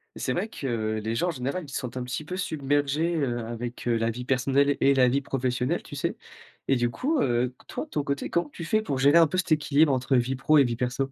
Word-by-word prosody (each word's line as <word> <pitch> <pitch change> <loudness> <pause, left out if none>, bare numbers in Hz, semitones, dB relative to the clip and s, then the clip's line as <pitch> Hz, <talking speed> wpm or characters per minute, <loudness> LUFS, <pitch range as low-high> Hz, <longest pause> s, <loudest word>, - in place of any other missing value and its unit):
C'est 130 - -2
vrai 190 +9 -1
que 110 - -2
les 110 +1 -2
gens, 175 - 0
en - - +1
général, 140 +5 -3
ils - - -13
se 135 - -3
sentent 125 -2 -6
un 125 - -2
petit 125 +5 -5
peu 180 - -5
submergés, 145 -1 0
heu, 120 -6 -1
avec, 120 +1 -6
heu, 120 - +2
la 115 0 +1
vie 125 +2 -5
personnelle 135 +2 +2
et 140 - +5
la 130 -1 +5
vie 135 +3 +1
professionnelle, 125 -2 -1
tu - - -9
sais? - - -2 0.5
Et 135 - +3
du 120 -1 +1
coup, 280 - 0
heu, 125 +1 0
toi, - - -5
de - - -26
ton 150 - -1
côté, 140 0 -3
comment 170 -3 0
tu 170 +3 -8
fais 215 +6 +2
pour 145 -10 -3
gérer 140 +4 +5
un 165 - +6
peu 185 - -3
cet 185 -2 -1
équilibre 150 -1 +3
entre 130 +1 +1
vie 125 +2 +1
pro 150 +4 +3
et 140 - +7
vie 120 -2 -1
perso? 125 +3 -2
135 Hz, 265 wpm, -26 LUFS, 125-150 Hz, 0.5 s, et